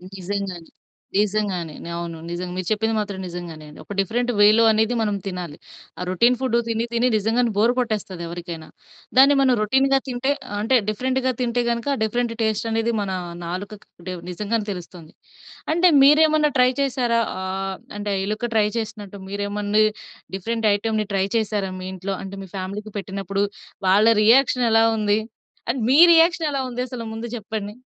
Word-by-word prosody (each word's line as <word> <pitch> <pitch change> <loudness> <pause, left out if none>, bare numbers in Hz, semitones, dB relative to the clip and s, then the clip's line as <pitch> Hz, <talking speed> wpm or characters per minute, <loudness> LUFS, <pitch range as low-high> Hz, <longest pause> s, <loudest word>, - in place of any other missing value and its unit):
నిజంగానే, 190 -2 -4 0.5
నిజంగానే. 200 -6 -1 0.2
అవును. 170 -1 -5
నిజంగా 180 +1 -4
మీరు 185 -1 -4
చెప్పింది 220 +1 0
మాత్రం 205 -2 -3
నిజంగానే. 170 -3 -8 0.2
ఒక - - -8
డిఫరెంట్ 240 +5 0
వేలో 210 +2 +6
అనేది 220 +2 +2
మనం 210 -2 0
తినాలి. 180 -5 -5 0.4
ఆ - - -5
రోటిన్ 235 +7 +3
ఫుడ్ 255 -3 +1
తిని, 230 0 -1
తిని 235 +2 +2
నిజంగానే 225 +3 +1
బోర్ 230 +4 +4
కొట్టేస్తది 210 -7 -3
ఎవరికైనా, 170 -2 -7 0.5
దాన్ని 275 +2 +7
మనం 260 -2 +4
రోటిన్‌గా 270 +5 +3
తింటే 255 +2 -1 0.2
ఆహ్, 205 - -4
అంటే 225 +5 +2
డిఫరెంట్‌గా 260 +4 0
తింటే 245 0 0
గనుక, 235 +2 -2 0.2
డిఫరెంట్ 235 +2 -1
టెస్ట్ 220 0 0
అనేది 225 +1 0
మన 200 -1 -3 0.3
నాలుకకి 195 +4 -6
అంటే 185 +1 -5 0.2
నిజంగానే 210 +4 -2
తెలుస్తుంది. 175 -3 -9 0.6
అంటే 350 +2 +5
మీరేమన్నా 305 +1 +5
ట్రై 250 0 +5
చేసారా? 245 -4 +1 0.2
ఆహ్, 190 0 -3 0.2
అంటే 205 0 -3
ఎలుక 215 +3 -2
ట్రై 215 -2 +4
చేసినట్టు 210 -3 -6
మీరేమన్నా 205 +1 0 0.5
డిఫరెంట్ 225 +3 -1
ఐటెమ్‌ని 215 +1 -1
ట్రై 190 0 +2
చేసారా? 210 -3 -1
మీ 185 - -6
ఇంట్లో 190 +1 -4
అంటే 195 0 -7
మీ - - -12
ఫ్యామిలీకి 200 +3 -5
పెట్టినప్పుడు, 195 0 -2 0.4
వాళ్ళ 200 +4 +5 0.2
రియాక్షన్ 250 +2 +4
ఎలా 225 0 +5
ఉంది? 210 -1 +2 0.5
అండ్, 245 0 -1
మీ 280 +4 +6
రియాక్షన్ 330 0 +4
ఎలా 275 - -1
ఉందసలు 250 -1 -4
ముందు 225 +1 -5
జెప్పండి? 210 -2 -5
215 Hz, 155 wpm, -22 LUFS, 195-240 Hz, 0.6 s, దాన్ని